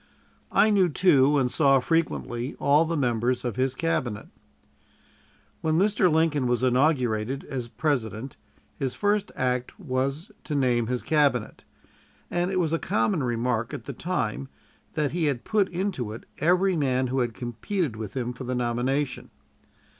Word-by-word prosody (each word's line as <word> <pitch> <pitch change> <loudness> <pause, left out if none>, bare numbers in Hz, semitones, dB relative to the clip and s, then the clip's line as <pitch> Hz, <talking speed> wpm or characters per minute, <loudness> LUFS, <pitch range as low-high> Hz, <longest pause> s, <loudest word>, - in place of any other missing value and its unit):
I 215 - +4
knew, 190 -4 +4
too, 145 -4 +4
and 125 -3 +1
saw 135 -3 +4
frequently, 130 -4 -1
all 145 +3 +4
the 165 0 -2
members 125 -1 0
of 120 - -2
his 130 +1 0
Cabinet. 125 -10 -2 1.3
When 160 0 +1
Mr. 195 -2 +3
Lincoln 155 -4 +2
was 125 +1 0
inaugurated 130 -2 +1
as 130 -4 -5
President, 125 -3 -2 0.4
his 130 -2 -2
first 205 0 0
act 125 +4 -2
was 140 +1 -2
to 150 - -3
name 125 -4 +2
his 125 0 -2
Cabinet; 140 -7 +1 0.7
and 175 +1 0
it 190 -1 0
was 165 -3 +1
a 165 - +1
common 110 +4 0
remark 120 -1 -1
at - - -8
the 140 - -6
time 135 -4 -3 0.4
that 150 -3 0
he 170 -1 0
had 140 -5 -1
put 205 -3 +1
into 175 - -2
it 110 - -9 0.2
every 180 +4 +3
man 130 -4 +1
who 130 +1 -1
had 120 -3 -1
competed 125 - -3
with 110 +1 -6
him 125 -1 -2
for 125 - -8
the 130 0 -2
nomination. 125 +3 -1
135 Hz, 155 wpm, -26 LUFS, 120-160 Hz, 1.3 s, I